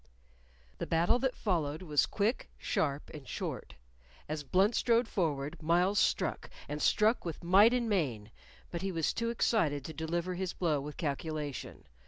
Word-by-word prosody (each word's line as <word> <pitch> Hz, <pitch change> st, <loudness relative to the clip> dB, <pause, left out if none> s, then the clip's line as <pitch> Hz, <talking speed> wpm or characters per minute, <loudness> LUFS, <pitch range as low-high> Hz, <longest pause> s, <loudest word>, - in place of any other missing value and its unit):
The -, -, -3 dB
battle 170 Hz, +9 st, +3 dB
that 260 Hz, 0 st, 0 dB
followed 160 Hz, -4 st, -1 dB
was 150 Hz, -4 st, +2 dB
quick, 215 Hz, +4 st, -1 dB
sharp, 145 Hz, -1 st, -1 dB
and 145 Hz, -4 st, -10 dB
short. -, -, -5 dB, 0.5 s
As 155 Hz, 0 st, -3 dB
Blunt 190 Hz, -, +3 dB
strode 235 Hz, +1 st, +3 dB
forward, 155 Hz, -6 st, -2 dB
Myles 175 Hz, +5 st, +3 dB
struck, -, -, 0 dB, 0.2 s
and 150 Hz, +1 st, -4 dB
struck 220 Hz, +3 st, +3 dB
with 165 Hz, -2 st, -6 dB
might 195 Hz, +6 st, +6 dB
and 245 Hz, -2 st, +1 dB
main, 130 Hz, -, -1 dB, 0.4 s
but 170 Hz, -, -4 dB
he 195 Hz, 0 st, -2 dB
was 165 Hz, -3 st, 0 dB
too 230 Hz, 0 st, -1 dB
excited 160 Hz, -, +1 dB
to 160 Hz, -, -6 dB
deliver 170 Hz, +3 st, -2 dB
his 180 Hz, 0 st, -3 dB
blow 155 Hz, -5 st, 0 dB
with 145 Hz, +1 st, -7 dB
calculation. 150 Hz, -1 st, -4 dB
170 Hz, 160 wpm, -32 LUFS, 150-200 Hz, 0.5 s, might